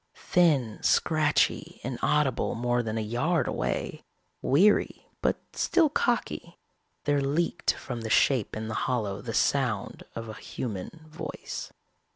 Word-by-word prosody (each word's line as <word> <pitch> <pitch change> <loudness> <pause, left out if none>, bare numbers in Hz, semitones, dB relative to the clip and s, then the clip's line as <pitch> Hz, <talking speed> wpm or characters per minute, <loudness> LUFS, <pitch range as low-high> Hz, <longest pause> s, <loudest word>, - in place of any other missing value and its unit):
Thin, 145 -11 +2
scratchy, - - +2
inaudible - - +1
more 120 +1 +1
than 110 -1 -3
a - - 0
yard 120 +11 0
away, - - -2 0.4
weary 190 +10 +3 0.2
but - - +2 0.2
still 330 -4 +3
cocky, 235 - -1 0.5
there 145 -1 +2
leaked 155 +6 +1
from 120 -3 -6
the 110 - -4
shape 110 0 +3
in 110 0 -4
the 110 - -4 0.2
hollow 105 -5 -1
the 115 0 -5
sound 125 -8 +1
of 115 0 -5
a 110 - -6
human 120 - -6
voice. 155 - -6
125 Hz, 130 wpm, -28 LUFS, 110-160 Hz, 0.5 s, weary